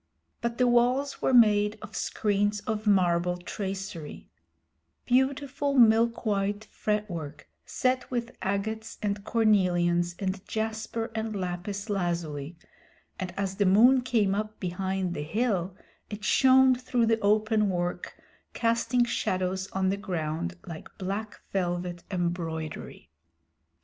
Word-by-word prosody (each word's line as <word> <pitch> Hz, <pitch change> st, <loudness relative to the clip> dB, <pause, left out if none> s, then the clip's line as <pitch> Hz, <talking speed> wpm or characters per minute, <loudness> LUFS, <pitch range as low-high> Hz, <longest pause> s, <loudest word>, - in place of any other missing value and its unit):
But 235 Hz, 0 st, -2 dB
the 250 Hz, -, +3 dB
walls 250 Hz, +4 st, +2 dB
were -, -, +2 dB
made 210 Hz, -3 st, +5 dB
of 220 Hz, -, -9 dB
screens 205 Hz, -1 st, 0 dB
of 215 Hz, +1 st, -3 dB
marble 180 Hz, -3 st, +3 dB
tracery 190 Hz, -3 st, -6 dB, 0.7 s
beautiful 275 Hz, +2 st, +1 dB
milk 230 Hz, -1 st, +4 dB
white 205 Hz, 0 st, 0 dB
fretwork, 175 Hz, -9 st, -3 dB, 0.2 s
set 255 Hz, 0 st, 0 dB
with 240 Hz, -1 st, -3 dB
agates 220 Hz, +3 st, -3 dB
and 200 Hz, -1 st, -1 dB
cornelians 175 Hz, -6 st, +2 dB
and 190 Hz, 0 st, -3 dB
jasper 220 Hz, +1 st, -3 dB
and 220 Hz, -1 st, -3 dB
lapis 195 Hz, +2 st, -4 dB
lazuli, 170 Hz, -6 st, -2 dB, 0.6 s
and 185 Hz, -2 st, -3 dB
as 195 Hz, -1 st, -2 dB
the 205 Hz, -2 st, +3 dB
moon 240 Hz, +7 st, +6 dB
came 225 Hz, -6 st, +1 dB
up 215 Hz, +1 st, -3 dB
behind 190 Hz, 0 st, -2 dB
the 150 Hz, -, -4 dB
hill 190 Hz, +1 st, -1 dB, 0.3 s
it 210 Hz, 0 st, -7 dB
shone 260 Hz, +4 st, +5 dB
through 250 Hz, -1 st, 0 dB
the 225 Hz, 0 st, +2 dB
open 215 Hz, 0 st, +2 dB
work, 175 Hz, -1 st, -3 dB, 0.4 s
casting 235 Hz, +1 st, +2 dB
shadows 185 Hz, -4 st, -1 dB
on 190 Hz, 0 st, 0 dB
the 195 Hz, -, 0 dB
ground 175 Hz, -2 st, -3 dB
like 165 Hz, -4 st, -8 dB
black 200 Hz, +3 st, -4 dB
velvet 175 Hz, -2 st, -2 dB
embroidery. 165 Hz, -, -4 dB
200 Hz, 120 wpm, -28 LUFS, 180-225 Hz, 0.7 s, moon